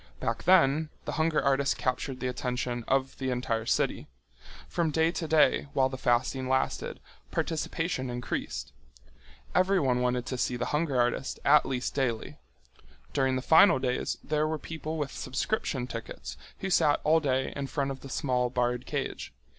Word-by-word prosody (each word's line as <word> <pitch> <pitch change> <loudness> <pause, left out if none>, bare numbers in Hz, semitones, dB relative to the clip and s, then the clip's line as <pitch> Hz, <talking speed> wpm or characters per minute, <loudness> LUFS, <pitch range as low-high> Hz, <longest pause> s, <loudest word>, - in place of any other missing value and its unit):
Back - - -2
then 160 -4 +4 0.2
the - - -3
hunger 160 -1 +1
artist 140 0 +2
captured 130 +1 -2
the 130 - -1
attention 125 -1 -2
of 135 0 0
the 130 -1 -1
entire 115 -3 -1
city. - - 0 0.6
From 170 -2 0
day 160 +2 +2
to 170 -2 -4
day 155 -2 +4
while 130 -1 +3
the 130 - -5
fasting 130 +1 +1
lasted, 130 0 -1 0.3
participation 160 -4 -2
increased. 120 0 -4 0.8
Everyone 180 -10 +3
wanted 125 -1 0
to 130 0 -4
see 125 - 0
the 120 - -2
hunger 150 -4 +1
artist 120 +2 0
at 150 +2 +6
least 130 -1 -2
daily. 125 -5 -2 0.7
During 130 -1 +2
the 130 - -2
final 165 +4 +7
days 130 -1 -1
there 150 0 0
were 160 0 -1
people 160 +1 -5
with 145 -3 -2
subscription 130 - -2
tickets 115 -2 -7 0.3
who 195 - -2
sat 145 -4 +4
all 160 +2 +4
day 130 -3 0
in 140 -1 -3
front 140 -1 -1
of 135 - -6
the 135 - -10
small 125 -2 0
barred 125 0 -1
cage. - - -3
135 Hz, 160 wpm, -29 LUFS, 125-155 Hz, 0.8 s, final